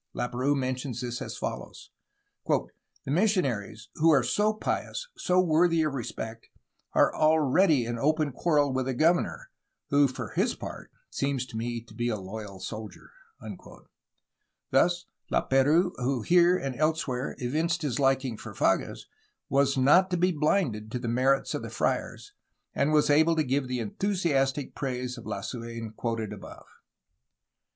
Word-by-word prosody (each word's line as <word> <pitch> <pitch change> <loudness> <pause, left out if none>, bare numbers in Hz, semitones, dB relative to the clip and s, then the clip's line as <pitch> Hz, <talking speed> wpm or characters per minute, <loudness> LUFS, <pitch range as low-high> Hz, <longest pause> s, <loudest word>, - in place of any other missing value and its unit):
Lap6rouse 125 +4 0
mentions 130 -1 -3
this 120 -1 -4
as - - -6
follows: - - -6 0.6
"The - - -3
missionaries, 130 - 0
who 165 +2 +4
are 140 -5 +5
so 210 - +2
pious, 215 - -3
so 180 0 +1
worthy 165 -1 +3
of 150 -2 -1
respect, 115 -3 -6 0.4
are - - +4
already 155 -2 +3
in 120 0 -3
open 155 +2 +1
quarrel 145 -1 +1
with 130 0 -1
the 130 - -1
governor, 175 - +1 0.4
who 145 0 +5
for 125 -5 -6
his - - 0
part - - -8 0.2
seemed 135 -2 -1
to 115 - -10
me 115 +1 -3
to 115 - -17
be 120 +2 -1
a 110 - -1
loyal 100 0 -8
soldier." 105 +3 -8 1.6
Thus, 175 0 +3 0.3
Lap^rouse, 150 +7 +3
who 125 -1 -1
here 175 +3 +5
and 135 -5 -4
elsewhere 150 -5 -1
evinced 160 +7 -1
his 140 -4 -1
liking 135 -3 +1
for - - -9
Fages, - - +1 0.5
was 140 0 +2
not 150 +9 +5
blinded 150 - +1
to - - 0
the 120 -1 -5
merits 130 +4 +2
of - - -3
the - - -6
friars, 410 - -2 0.4
and 140 +2 +1
was 150 -1 +4
able 160 +3 +4
to 155 - +2
give 135 0 0
the 125 0 -2
enthusiastic 140 - -1
praise 125 -2 -4
of 115 - -11
Lasuen 115 +2 -5
quoted 115 -1 -3
above. - - -11
135 Hz, 145 wpm, -28 LUFS, 120-160 Hz, 1.6 s, are